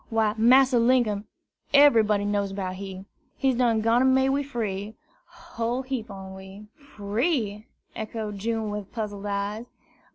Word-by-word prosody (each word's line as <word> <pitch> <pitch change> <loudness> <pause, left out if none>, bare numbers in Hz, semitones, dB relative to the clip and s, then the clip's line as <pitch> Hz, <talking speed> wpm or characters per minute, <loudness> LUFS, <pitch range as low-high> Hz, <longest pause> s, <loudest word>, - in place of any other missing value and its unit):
"Why, 220 -2 +1
Massa 250 +2 +5
Linkum, 230 -4 +2 0.5
eberybody 220 -8 +5
knows 200 -1 -1
'bout 185 -2 -4
he. 190 -1 -8 0.3
He's 270 -1 +2
done 235 -3 +2
gone 245 +4 +3
made 265 0 +3
we 275 +1 +1
free, 220 -6 -4 0.3
whole 260 -8 -4
heap 255 -4 -4
on 190 -1 -9
we." 190 +2 -11
"Free!" 220 -3 -2 0.3
echoed 215 -2 -5
June, 220 0 -2
with 205 -2 -6
puzzled 205 -3 -5
eyes. 205 +3 -3
220 Hz, 135 wpm, -25 LUFS, 205-250 Hz, 0.5 s, Massa